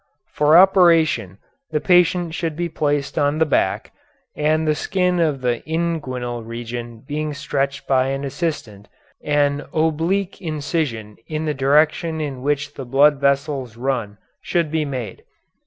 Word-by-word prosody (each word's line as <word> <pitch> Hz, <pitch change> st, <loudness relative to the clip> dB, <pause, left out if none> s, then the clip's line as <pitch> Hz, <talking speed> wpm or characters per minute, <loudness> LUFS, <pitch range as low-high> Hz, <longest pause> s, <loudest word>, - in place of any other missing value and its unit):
For 150 Hz, +2 st, +5 dB
operation 165 Hz, -, +4 dB, 0.3 s
the 155 Hz, -, 0 dB
patient 175 Hz, -1 st, +3 dB
should 165 Hz, -2 st, -3 dB
be 170 Hz, +1 st, -2 dB
placed 145 Hz, -1 st, -1 dB
on 145 Hz, +1 st, +1 dB
the 160 Hz, -, +3 dB
back, 150 Hz, -, 0 dB, 0.4 s
and, 155 Hz, +1 st, +1 dB
the 155 Hz, -, +3 dB
skin 180 Hz, +2 st, 0 dB
of 150 Hz, -5 st, +1 dB
the 120 Hz, -2 st, 0 dB
inguinal 130 Hz, -8 st, -2 dB
region 115 Hz, 0 st, -7 dB
being 150 Hz, 0 st, -3 dB
stretched 140 Hz, -1 st, -2 dB
by 130 Hz, -1 st, +2 dB
an 135 Hz, +1 st, -3 dB
assistant, 135 Hz, -, -4 dB, 0.4 s
an 145 Hz, -1 st, +1 dB
oblique 165 Hz, +6 st, 0 dB
incision 145 Hz, -, -3 dB
in 155 Hz, 0 st, -3 dB
the 150 Hz, -, 0 dB
direction 150 Hz, +4 st, +2 dB
in 140 Hz, -4 st, -4 dB
which 145 Hz, +1 st, -1 dB
the 135 Hz, -, -7 dB
blood 140 Hz, +3 st, +4 dB
vessels 140 Hz, -4 st, 0 dB
run 120 Hz, -5 st, -2 dB, 0.2 s
should 170 Hz, -3 st, -1 dB
be 160 Hz, -1 st, 0 dB
made. 125 Hz, -8 st, -6 dB
145 Hz, 140 wpm, -21 LUFS, 130-160 Hz, 0.4 s, For